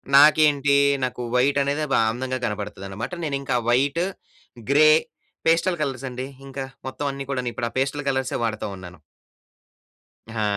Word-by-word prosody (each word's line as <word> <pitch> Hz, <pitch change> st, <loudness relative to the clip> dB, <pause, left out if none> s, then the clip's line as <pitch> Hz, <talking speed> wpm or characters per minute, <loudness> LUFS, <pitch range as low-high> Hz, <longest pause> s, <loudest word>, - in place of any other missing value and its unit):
నాకేంటీ, 145 Hz, -1 st, +6 dB, 0.3 s
నాకు 125 Hz, -1 st, -2 dB
వైటనేదే 140 Hz, +3 st, +2 dB
బా -, -, +4 dB
అందంగా 130 Hz, +2 st, -3 dB
కనపడతదనమాట. 105 Hz, -1 st, -5 dB
నేనింకా 140 Hz, -4 st, -2 dB
వైటు, 140 Hz, +8 st, +2 dB, 0.7 s
గ్రే, 155 Hz, +2 st, +7 dB, 0.6 s
పేస్టల్ 170 Hz, +1 st, +2 dB
కలర్సండి 130 Hz, -2 st, -4 dB, 0.2 s
ఇంక 135 Hz, -, -11 dB, 0.3 s
మొత్తవన్నీ 140 Hz, 0 st, -3 dB
కూడాను. 125 Hz, -3 st, -2 dB
ఇప్పుడా 115 Hz, +1 st, -2 dB
పేస్టల్ 140 Hz, +1 st, -1 dB
కలర్స్ 130 Hz, -1 st, -1 dB
వాడతా 110 Hz, -2 st, -2 dB
ఉన్నాను. 90 Hz, -1 st, -11 dB, 1.3 s
ఆ! 110 Hz, -1 st, -2 dB
135 Hz, 115 wpm, -23 LUFS, 120-145 Hz, 1.3 s, గ్రే